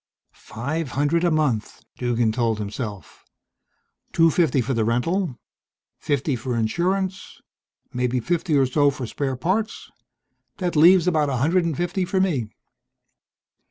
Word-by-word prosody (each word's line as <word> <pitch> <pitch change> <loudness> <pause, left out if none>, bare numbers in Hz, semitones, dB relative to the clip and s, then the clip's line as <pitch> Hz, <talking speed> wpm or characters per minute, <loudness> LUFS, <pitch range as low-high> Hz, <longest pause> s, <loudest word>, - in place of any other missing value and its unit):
"Five 140 +5 -5
hundred 145 +5 +1
a 175 - +3
month," 150 -9 -1 0.2
Duggan 120 -2 +1
told 115 -1 0
himself. 105 -1 -6 0.9
"Two 165 -1 +4
fifty 160 -4 +2
for 125 +2 -1
the 115 -2 +1
rental, 130 - 0 0.6
fifty 140 -1 -1
for 120 0 -3
insurance 185 - -1 0.5
maybe 125 0 0
fifty 165 +3 0
or 135 - +4
so 145 +3 +3
for 135 -2 -5
spare 135 +3 -3
parts 195 - -2 0.7
that 180 -3 -2
leaves 170 +3 +6
about 155 -5 +2
a 130 - -1
hundred 170 +7 +2
and 160 -5 -2
fifty 175 +2 -1
for 190 +1 -1
me." 150 - 0
145 Hz, 135 wpm, -23 LUFS, 125-175 Hz, 0.9 s, leaves